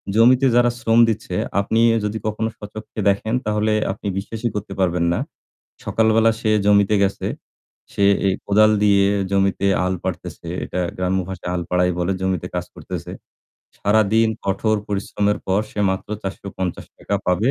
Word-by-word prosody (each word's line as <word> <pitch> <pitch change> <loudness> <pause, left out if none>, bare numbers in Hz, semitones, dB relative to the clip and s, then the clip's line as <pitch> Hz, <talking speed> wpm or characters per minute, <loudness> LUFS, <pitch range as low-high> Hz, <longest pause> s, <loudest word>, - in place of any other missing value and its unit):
জমিতে 125 +4 +5
যারা 120 0 +5
শ্রম 115 0 +3
দিচ্ছে 110 - -3 0.2
আপনি 110 +3 0 0.3
যদি 105 +1 -2
কখনো 110 +1 -1
স্বচক্ষে 110 +1 -9
দেখেন 100 +3 -1
তাহলে 105 0 +1 0.2
আপনি 100 +1 -7
বিশ্বাসই 110 +4 -3
করতে 105 0 -4
পারবেন 90 -2 +1
না। - - -1 0.7
সকালবেলা 110 0 +3
সে 110 - +1
জমিতে 100 0 +4
গেছে, 100 0 -1 0.7
সে 100 - 0 0.2
এ - - +4 0.2
কোদাল 110 +1 +5
দিয়ে 100 -1 +4 0.3
জমিতে 100 0 +1 0.2
হাল 90 0 0
পারতেছে। - - -5 0.2
এটা 90 - -4 0.2
গ্রাম্য 95 +1 0
ভাষায় 90 -1 -5
হাল 90 -1 -2
পারাই 90 0 +2
বলে। 90 +2 0
জমিতে 95 -3 -1
কাজ - - -2
করতেছে। - - -7 0.7
সারাদিন 110 +2 +3 0.2
কঠোর 110 +3 +1
পরিশ্রমের 105 0 -1
পর 95 +2 +2
সে 105 - -4
মাত্র 95 - -4
৳৪৫০ 95 0 -5
পাবে 90 +8 +2
100 Hz, 145 wpm, -21 LUFS, 95-110 Hz, 0.7 s, জমিতে